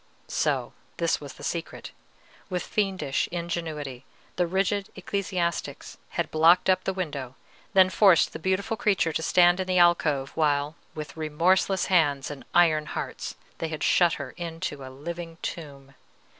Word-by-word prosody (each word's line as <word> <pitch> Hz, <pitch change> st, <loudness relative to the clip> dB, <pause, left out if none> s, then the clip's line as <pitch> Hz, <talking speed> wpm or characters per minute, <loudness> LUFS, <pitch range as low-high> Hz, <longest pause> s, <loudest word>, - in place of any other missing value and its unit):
So -, -, -1 dB, 0.2 s
this -, -, 0 dB
was -, -, -8 dB
the -, -, -13 dB
secret. -, -, -4 dB, 0.6 s
With 180 Hz, -2 st, -2 dB
fiendish 190 Hz, -9 st, -1 dB
ingenuity, 160 Hz, -6 st, -4 dB, 0.3 s
the 180 Hz, -, +1 dB
rigid 195 Hz, +2 st, 0 dB
ecclesiastics 185 Hz, -2 st, -3 dB, 0.2 s
had -, -, -1 dB
blocked 165 Hz, +4 st, +5 dB
up 185 Hz, 0 st, 0 dB
the -, -, +1 dB
window, 145 Hz, -9 st, -4 dB, 0.4 s
then 190 Hz, -1 st, +6 dB
forced 185 Hz, -1 st, +5 dB
the -, -, -6 dB
beautiful 190 Hz, +6 st, 0 dB
creature 195 Hz, -7 st, +1 dB
to 160 Hz, -, -1 dB
stand 175 Hz, +2 st, +4 dB
in 185 Hz, -, -2 dB
the 185 Hz, 0 st, +1 dB
alcove, 160 Hz, -6 st, +3 dB
while 145 Hz, -1 st, +1 dB, 0.2 s
with 155 Hz, -1 st, -7 dB
remorseless 175 Hz, +4 st, +2 dB
hands 145 Hz, -7 st, +2 dB
and 145 Hz, -, -9 dB
iron 155 Hz, -3 st, +4 dB
hearts -, -, -5 dB, 0.2 s
they 165 Hz, -, -2 dB
had 155 Hz, -1 st, -5 dB
shut 175 Hz, -2 st, +4 dB
her 140 Hz, -3 st, -5 dB
into 165 Hz, -4 st, -5 dB
a 130 Hz, -, -8 dB
living 165 Hz, +5 st, -7 dB
tomb. 140 Hz, -4 st, -7 dB
170 Hz, 150 wpm, -26 LUFS, 150-185 Hz, 0.6 s, then